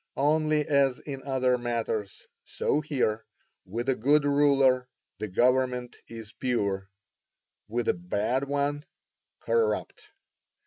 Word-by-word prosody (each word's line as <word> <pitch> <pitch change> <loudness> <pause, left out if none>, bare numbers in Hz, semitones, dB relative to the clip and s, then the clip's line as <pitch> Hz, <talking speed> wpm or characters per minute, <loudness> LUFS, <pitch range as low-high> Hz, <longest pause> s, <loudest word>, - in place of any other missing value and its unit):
Only 155 +1 +2
as 140 -3 +2
in 135 -2 -7
other 130 -2 +1
matters, 115 -4 -3 0.2
so 150 - -1
here; 125 -8 -1 0.4
with 115 +6 -4
a 135 - +3
good 145 +5 +3
ruler, 135 -3 +3 0.3
the 110 - -3
government 125 +3 +1
is 115 -1 -10
pure; 100 -7 -1 0.8
with 120 +2 -2
a - - +4
bad 105 +9 -1
one, 145 +1 -1 0.6
corrupt. 465 -2 -1
130 Hz, 110 wpm, -27 LUFS, 115-140 Hz, 0.8 s, a